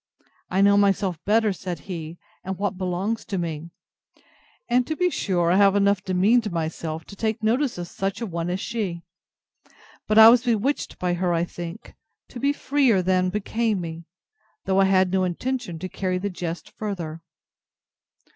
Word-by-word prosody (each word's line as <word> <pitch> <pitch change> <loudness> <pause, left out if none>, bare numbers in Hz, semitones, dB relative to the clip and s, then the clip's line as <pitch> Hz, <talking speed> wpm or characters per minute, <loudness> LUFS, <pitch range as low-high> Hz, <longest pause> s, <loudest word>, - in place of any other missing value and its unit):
I 190 +1 +1
know 200 0 +5
myself 195 -4 +1
better, 215 0 +3
said 180 -4 -6
he, 165 -2 -7 0.3
and 190 0 -4
what 200 0 -1
belongs 185 +4 -2
to 195 - -3
me: 165 -2 -4 1.0
And 245 0 +2
to 315 - -2
be 360 +2 +1
sure 175 - 0
I 185 - +4
have 200 -1 +5
enough 200 -1 +2
demeaned 205 +4 +2
myself 160 -1 -4
to - - -11
take 220 +2 -2
notice 245 +3 +1
of 175 -1 -5
such 195 +2 -3
a 235 - -3
one 170 -3 -3
as 180 +1 -2
she; 195 -7 -3 1.0
but 215 - +2
I 220 0 +11
was 240 +1 +5
bewitched 245 +3 -1
by 180 -1 -1
her, 175 0 0
I 165 - +1
think, 175 +3 -8 0.4
to 245 - -8
be 280 +3 +2
freer 270 -9 +2
than 185 0 +2
became 210 +2 -1
me; 165 -1 -6 0.6
though 190 0 +2
I 195 - +5
had 190 -1 +3
no 190 0 +2
intention 220 +1 -3
to 185 +3 -5
carry 185 -1 -2
the 200 +2 -3
jest 170 -2 -5
farther. 170 -7 -5
190 Hz, 175 wpm, -24 LUFS, 175-220 Hz, 1.0 s, I